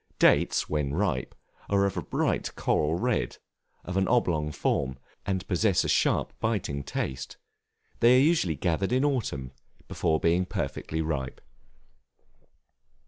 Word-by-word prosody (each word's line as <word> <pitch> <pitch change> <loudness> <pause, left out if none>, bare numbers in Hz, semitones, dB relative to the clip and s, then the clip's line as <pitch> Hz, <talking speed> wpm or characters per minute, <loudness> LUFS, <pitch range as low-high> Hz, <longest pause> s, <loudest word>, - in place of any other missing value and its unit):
Dates, - - +3
when 75 -2 -1
ripe, 85 -9 -1 0.3
are 100 -1 +3
of 100 - -1
a - - -2
bright - - -1
coral 75 +1 +1
red, 120 +5 -1 0.5
of 90 +1 -3
an 95 - +2
oblong 80 -11 +1
form, 65 -3 -1 0.3
and 95 -2 -2
possess 95 0 +2
a - - -2
sharp - - +2
biting 100 -11 -1
taste: 65 -1 -4 0.6
they 120 +2 +6
are - - +5
usually 150 - +2
gathered 85 - 0
in 130 +3 +3
autumn, 95 - -1 0.4
before 80 -1 0
being 85 +2 +2
perfectly 80 -2 -3
ripe. 70 -5 -3
85 Hz, 135 wpm, -27 LUFS, 75-105 Hz, 0.6 s, they